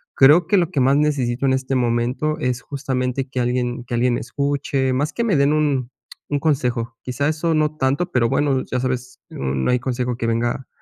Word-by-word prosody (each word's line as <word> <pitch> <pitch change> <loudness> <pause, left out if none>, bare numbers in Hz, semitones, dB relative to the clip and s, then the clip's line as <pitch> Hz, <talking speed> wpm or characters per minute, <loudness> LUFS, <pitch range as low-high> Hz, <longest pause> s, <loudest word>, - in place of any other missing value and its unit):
creo 150 +6 +6
que 200 - +2
lo 170 -3 +2
que 135 - 0
más 135 +2 +4
necesito 140 -4 0
en 130 - +3
este 130 0 -1
momento 125 +5 0
es 125 -3 -1
justamente 130 -1 -2
que 130 - -3
alguien 125 0 -1
que 120 - -7
alguien 120 0 +2
escuche, 140 0 -1
más 145 +4 -1
que 235 - -1
me 220 -6 +2
den 140 +2 +3
un 140 -5 0 0.4
un 145 - +1
consejo. 125 -6 -1
Quizá, 130 +3 -2
eso 160 +1 0
no 155 0 +1
tanto, 140 +6 0
pero 115 -2 +2
bueno, 135 -1 +1
ya 125 - 0
sabes, 125 0 -3
no 65 - -1
hay 125 - +2
consejo 125 -1 -2
que 115 - -3
venga, 120 +3 -1
130 Hz, 200 wpm, -21 LUFS, 125-145 Hz, 0.4 s, creo